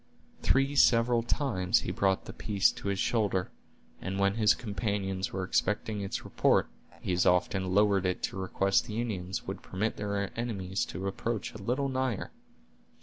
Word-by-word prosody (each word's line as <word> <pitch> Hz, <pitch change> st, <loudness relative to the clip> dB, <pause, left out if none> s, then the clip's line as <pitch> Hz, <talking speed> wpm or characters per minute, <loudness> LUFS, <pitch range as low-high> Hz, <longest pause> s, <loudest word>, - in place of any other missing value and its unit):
Three 135 Hz, +2 st, +2 dB
several 120 Hz, -2 st, +5 dB
times 115 Hz, -7 st, +1 dB
he -, -, -3 dB
brought 95 Hz, -1 st, +1 dB
the -, -, -8 dB
piece 100 Hz, -3 st, +2 dB
to -, -, -8 dB
his 100 Hz, -1 st, 0 dB
shoulder, 95 Hz, 0 st, 0 dB, 0.5 s
and 95 Hz, +1 st, -3 dB
when 100 Hz, 0 st, +2 dB
his 105 Hz, -1 st, +4 dB
companions 100 Hz, -4 st, -2 dB
were 95 Hz, 0 st, -3 dB
expecting 105 Hz, +2 st, 0 dB
its 95 Hz, -, -4 dB
report, -, -, +2 dB, 0.3 s
he 90 Hz, -, -1 dB
as 90 Hz, -, +2 dB
often 90 Hz, +1 st, +2 dB
lowered 100 Hz, -2 st, +4 dB
it 90 Hz, -, -2 dB
to -, -, -2 dB
request 95 Hz, +1 st, +1 dB
the 110 Hz, +1 st, -3 dB
Indians 95 Hz, -6 st, -3 dB
would -, -, -5 dB
permit 105 Hz, +4 st, -2 dB
their 100 Hz, -1 st, -2 dB
enemies 100 Hz, -5 st, -2 dB
to 95 Hz, -, -6 dB
approach 110 Hz, +2 st, -3 dB
a 110 Hz, -, -9 dB
little 125 Hz, +7 st, 0 dB
nigher. 130 Hz, -5 st, -2 dB
100 Hz, 165 wpm, -30 LUFS, 95-115 Hz, 0.5 s, several